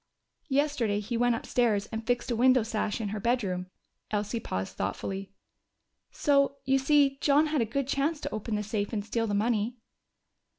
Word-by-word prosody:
"Yesterday 270 -7 +1
he 215 +3 -4
went 240 0 +3
upstairs 225 -3 +1
and 225 0 -5
fixed 245 0 0
a - - +1
window 255 +1 +5
sash 215 -1 -2
in 215 -3 -2
her 210 +1 -3
bedroom." 200 -6 0 0.4
Elsie 210 +2 -1
paused 95 - -4
thoughtfully. 190 - -4 0.8
"So 280 -1 +2
you 270 0 +3
see 275 0 +3
John 290 +2 +4
had 305 -3 0
a - - +2
good 255 +4 -2
chance 285 +3 0
to - - -4
open 215 +1 -3
the 210 - -1
safe 205 +1 -2
and 205 -2 -2
steal 225 +1 -1
the 205 - 0
money." 225 +2 0
230 Hz, 175 wpm, -29 LUFS, 210-270 Hz, 0.8 s, window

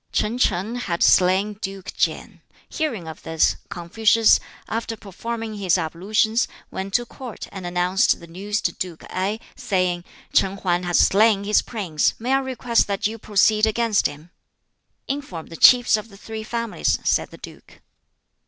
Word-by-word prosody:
Ch'in 230 +4 -1
Shing 220 +1 0
had 175 -8 -1
slain 190 +3 +4
Duke 195 -1 -6
Kien. - - -2 0.3
Hearing 235 - -3
of 160 - -8
this, 160 0 +1
Confucius, 220 +6 +3 0.3
after 225 0 -3
performing 225 +3 -6
his 190 -3 +2
ablutions, 205 +7 0 0.2
went 195 +1 -4
to 240 - +2
Court 245 -2 -9
and 185 -2 -6
announced 180 +2 +2
the 170 - -11
news 200 +5 -3
to - - 0
Duke 175 -3 -6
Ngai, 195 +4 -1 0.2
saying, 180 -3 -1 0.3
"Ch'in 195 +1 +2
Hang 180 -2 0
has 175 -1 0
slain 205 0 +4
his 210 +1 +3
prince. 180 -10 -1
May 245 +4 -1
I 270 - +4
request 250 -3 0
that 200 -1 -2
you 225 +2 -1
proceed 215 +1 +3
against 220 -1 +2
him?" 150 +4 -12 0.8
"Inform 270 - -5
the 165 - -9
Chiefs 245 +6 +6
of 215 +1 -5
the 200 - -15
Three 220 +2 -7
Families," 230 0 -1
said - - +1
the - - -13
duke. - - -13
205 Hz, 160 wpm, -22 LUFS, 180-225 Hz, 0.8 s, Chiefs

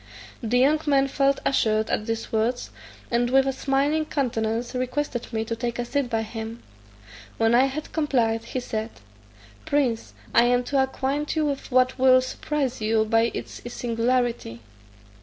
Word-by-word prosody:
The 235 +2 +1
young 285 +5 +4
man 275 -1 +4
felt 275 0 +1
assured 220 -4 +1
at 215 - -1
these 225 0 -3
words, 230 +3 -1 0.4
and 240 0 +2
with 270 +1 +4
a 270 - 0
smiling 285 +4 +1
countenance 235 -5 -1
requested 255 -1 -2
me 220 -1 -2
to 230 0 -3
take 235 0 -3
a 245 - -2
seat 275 0 -1
by 225 -2 0
him. 225 +1 -7 0.7
When 225 0 +3
I 250 +3 +6
had 275 +3 -5
complied, 235 -7 +1
he 255 +2 -4
said 220 -2 -3 0.8
"Prince, 260 -6 0 0.2
I 235 - +6
am 245 0 +3
to 275 +2 +1
acquaint 270 +3 -1
you 310 -1 +1
with 280 -1 -3
what 255 +1 +3
will 255 0 +6
surprise 260 0 -3
you 220 0 +2
by 225 +1 +3
its - - -7
singularity. 235 - -1
245 Hz, 160 wpm, -25 LUFS, 225-270 Hz, 0.8 s, I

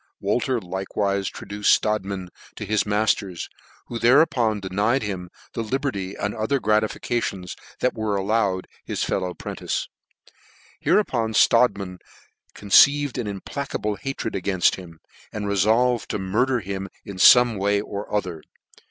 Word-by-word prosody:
Wolter 120 +5 0
likewife 95 +1 -2
traduced 105 +1 -1
Strodtman 100 -3 -2 0.3
to - - -6
his 105 +1 0
matters, 105 -3 0 0.4
who 120 - -6
thereupon 120 -4 +3
denied 100 +7 0
him 95 -4 -5 0.2
the 115 - -3
liberty 110 -5 -3
and 100 0 -3
other 110 +5 0
gratifications 105 -3 -1 0.3
that 125 - +2
were 110 -2 -2
allowed 100 -2 0
to - - -25 0.2
his - - -2
fellow 90 -2 -2
'prentice. - - -4 0.9
Hereupon 120 - +1
Strodtman 100 -7 +3 0.6
conceived 140 +6 +4
an 115 - -3
implacable 105 +2 -4
hatred 115 +1 -4
againft 95 -1 +2
him, 85 -4 -10 0.3
and 105 -1 -4
refolvcd 110 +4 +2
to - - -2
murder 115 +6 0
him 95 0 -5 0.2
in 100 -2 -8
fome 120 +2 +6
way 100 +1 +2
or 100 0 -6
other. 90 -6 -2
105 Hz, 130 wpm, -23 LUFS, 95-115 Hz, 0.9 s, fome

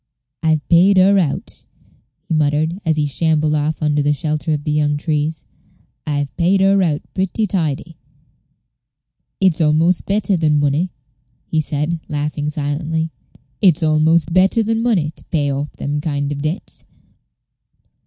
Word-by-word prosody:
"I've 155 -2 0
paid 185 +3 +5
her 195 +2 +5
out," 160 -6 -3 0.6
he 170 - -2
muttered, 155 +3 +1
as 160 -3 +1
he 150 - +1
shambled 155 +1 +1
off 155 +1 -1
under 150 -1 +1
the 145 +1 +2
shelter 155 +1 -2
of 150 -1 -1
the 150 - -2
young 150 -1 +1
trees; 155 +1 -2 0.6
"I've 145 -1 -2
paid 185 +3 +2
her 195 0 +4
out 155 -5 0
pretty 190 +3 -1
tidy. 165 -4 -3 1.4
It's 185 -4 +2
almost 160 +3 +2
better 200 -1 +1
than 155 -2 +2
money," 145 +5 0 0.5
he 160 - 0
said, 150 +3 -2
laughing 150 0 -2
silently 155 +2 -2 0.5
"it's 180 -5 +4
almost 160 +1 +2
better 190 +5 +3
than 225 +1 0
money 195 -11 +1
to - - -11
pay 145 -4 -1
off 145 +2 -3
them 145 +1 -3
kind 145 -2 -2
of 140 -1 -4
debts." 155 +7 -5
155 Hz, 145 wpm, -18 LUFS, 150-175 Hz, 1.4 s, paid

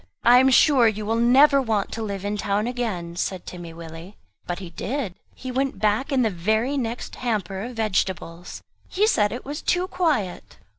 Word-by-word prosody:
"I 245 +1 +7
am 265 +1 +5
sure 260 -2 +5
you 215 -1 -2
will 225 +2 0
never 270 +5 +5
want 220 -5 -1
to 225 - -5
live 200 -3 -4
in 205 +1 -1
town 205 +1 -1
again," 215 -9 -3
said 185 0 -3
Timmy 175 -2 -8
Willie. 165 +3 -10 0.3
But 175 - -2
he 185 -3 -8
did. 220 - -3 0.2
He 260 - -6
went 270 +1 -1
back 215 +7 0
in 260 -2 +3
the 220 - +1
very 220 +9 0
next 235 -3 -4
hamper 195 -6 -2
of 245 0 -8
vegetables; 185 -5 -2 0.2
he 410 +3 +1
said 210 - +2
it 245 - -6
was 290 +3 -5
too 360 +1 0
quiet!! 290 - -1
220 Hz, 190 wpm, -24 LUFS, 190-255 Hz, 0.3 s, I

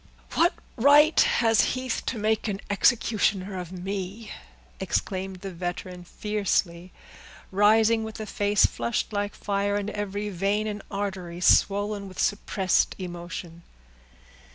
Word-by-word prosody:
"What 345 +3 +3 0.2
right 290 +5 +6
has 225 -3 +4 0.2
Heath 255 -2 -2
to 250 - -1
make 220 +1 0
an 200 -2 -2
executioner 200 -3 +1
of 180 -1 -7
me!" 195 +3 -5 0.5
exclaimed 190 -1 -3
the 195 - -6
veteran 180 0 -6
fiercely, 185 -3 -2 0.6
rising 220 +3 +4
with 220 0 -7
a 215 - -4
face 205 0 +2
flushed 230 -1 -2
like 205 0 -2
fire, 200 0 -1
and 205 +1 -2
every 205 0 -3
vein 200 +3 0
and 210 -1 -4
artery 190 -4 -4
swollen 200 +2 +3
with 185 - -12
suppressed 195 -2 +1
emotion. 175 -1 -7
200 Hz, 125 wpm, -26 LUFS, 185-215 Hz, 0.6 s, right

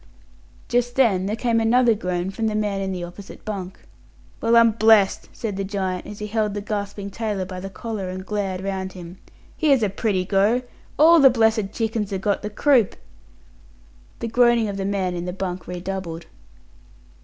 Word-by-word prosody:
Just 245 0 0
then 200 -8 +3
there 210 - -1
came 230 0 +1
another 235 +1 +4
groan 180 -3 -2
from 220 +3 -2
the 215 - -1
man 205 -2 -1
in 195 0 -2
the 180 -2 -4
opposite 175 +3 -10
bunk. 195 -3 -6 0.6
"Well, 230 +1 +4
I'm 230 -1 +6
blessed!" 220 -2 +4
said 210 -4 -5
the 195 - -1
giant, 190 -2 -3
as 210 - -8
he 210 - -5
held 210 -1 -1
the - - -2
gasping 200 -1 -4
tailor 210 -3 -2
by 185 0 -7
the 195 +1 -6
collar 210 -2 -5
and 185 0 -6
glared 195 -3 -2
round 190 -1 -4
him. 180 0 -10 0.4
"Here's 280 -7 +3
a 210 - +2
pretty 195 -2 -1
go! 205 +6 +2 0.3
All 330 +3 +7
the 275 -2 +8
blessed 220 -4 +2
chickens 220 -2 -2
ha' 195 -2 -3
got 205 +1 0
the 210 - -4
croup!" 240 -1 +3 1.3
The 230 - -2
groaning 240 -1 +3
of 200 - -4
the 195 - -2
man 195 -2 -1
in 175 0 -4
the 180 - -4
bunk 185 -1 -5
redoubled. 180 -2 -5
205 Hz, 185 wpm, -23 LUFS, 190-225 Hz, 1.3 s, the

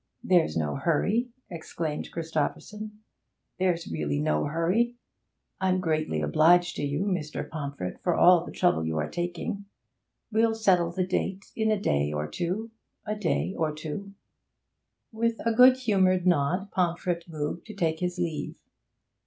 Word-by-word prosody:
'There's 170 - +3
no 75 -2 0
hurry,' 210 +9 +1 0.2
exclaimed 160 -2 -4
Christopherson. 210 +7 -4 0.6
'There's 180 -2 +1
really 75 -3 -2
no 75 0 +1
hurry. 180 +11 +1 0.6
I'm 185 -1 +2
greatly 155 - 0
obliged 175 - +4
to - - -3
you, 145 +3 -1
Mr. 180 -7 -2
Pomfret, 140 - -5
for 175 - +1
all 175 -1 +6
the - - -8
trouble 175 - +2
you 80 0 -2
are 75 -1 0
taking. 175 +3 -4 0.7
We'll 225 +1 +3
settle 180 -6 +3
the 185 +1 -1
date 190 +1 -2
in 220 -1 +1
a 215 -2 +2
day 75 - +1
or 75 0 -2
two 185 - -3 0.3
a 210 0 -2
day 190 -1 -1
or 155 -2 -1
two.' 180 +6 -6 1.0
With 230 0 -1
a 230 - +2
good 255 +2 +7
humoured 190 -7 +2
nod 180 +4 +1
Pomfret 175 -1 -1
moved 155 +3 -4
to 215 - -9
take 160 -4 0
his 180 0 -2
leave. 170 -4 -3
175 Hz, 145 wpm, -27 LUFS, 155-200 Hz, 1.0 s, good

